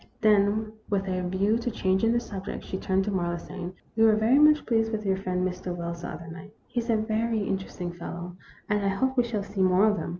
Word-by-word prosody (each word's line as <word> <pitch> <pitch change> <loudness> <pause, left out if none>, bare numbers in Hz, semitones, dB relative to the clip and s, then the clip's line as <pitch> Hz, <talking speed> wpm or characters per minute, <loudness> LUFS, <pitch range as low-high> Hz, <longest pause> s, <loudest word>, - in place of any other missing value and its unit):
Then, 215 0 +3 0.2
with 195 -1 0
a 185 -1 -1
view 200 +5 +2
to 240 - -2
changing 200 0 +1
the 235 - +3
sub 200 -5 -7
ject, - - -5
she 190 - -5
turned 190 0 +1
to 205 - -2
Marlowe, 175 -2 -1
saying: 180 +1 -7 0.2
"We 225 - +4
were 220 -1 +6
very 225 +6 +4
much 300 0 +6
pleased 225 -1 +1
with 215 -1 -3
your 190 -1 +2
friend 185 -1 -1
Mr. 180 -1 -4
Wells 170 0 -5
the 175 - -5
other 170 - -7
night. 180 +6 -10
He 245 - -3
is 235 +1 -4
a 225 - +4
very 220 +1 0
interesting 190 -2 -3
fellow, 175 0 -7 0.3
and 210 -1 +1
I - - +1
hope 260 +7 0
we 245 - +4
shall 225 -4 -2
see 195 -1 -4
more 185 +2 +5
of 210 -1 +3
him." - - -4
200 Hz, 245 wpm, -27 LUFS, 185-220 Hz, 0.3 s, were